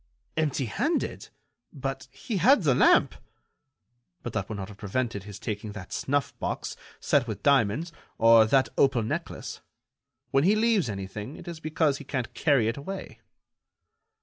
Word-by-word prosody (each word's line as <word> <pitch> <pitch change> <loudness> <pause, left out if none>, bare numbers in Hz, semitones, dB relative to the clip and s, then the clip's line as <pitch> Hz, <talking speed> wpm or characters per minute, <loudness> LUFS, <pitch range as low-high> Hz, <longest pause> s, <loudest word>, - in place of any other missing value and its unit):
"Empty 150 -4 0
handed! 290 - -2 0.4
But - - -5
he 225 -6 -4
had 230 - +5
the 140 -4 +4
lamp." - - +5 1.1
"But 120 - -5
that - - -2
would 110 - -4
not 95 -1 -6
have 100 - -12
prevented 105 -1 -2
his 105 -1 -8
taking 105 0 -5
that 100 -3 -8
snuff 145 -1 -1
box, - - -3 0.2
set 135 -4 +2
with 110 - -5
diamonds, 140 +4 +2 0.3
or 115 0 +7
that 135 +3 +3
opal 130 -4 +4
necklace. 110 - -5 0.7
When 135 - +3
he 200 +5 +4
leaves 215 - +2
anything, 105 +6 -6
it - - -12
is 170 -2 -6
because 155 -2 0
he - - -8
can't 130 -3 -4
carry 140 -8 +2
it 115 - -1
away." 190 +7 -7
135 Hz, 155 wpm, -27 LUFS, 110-155 Hz, 1.1 s, or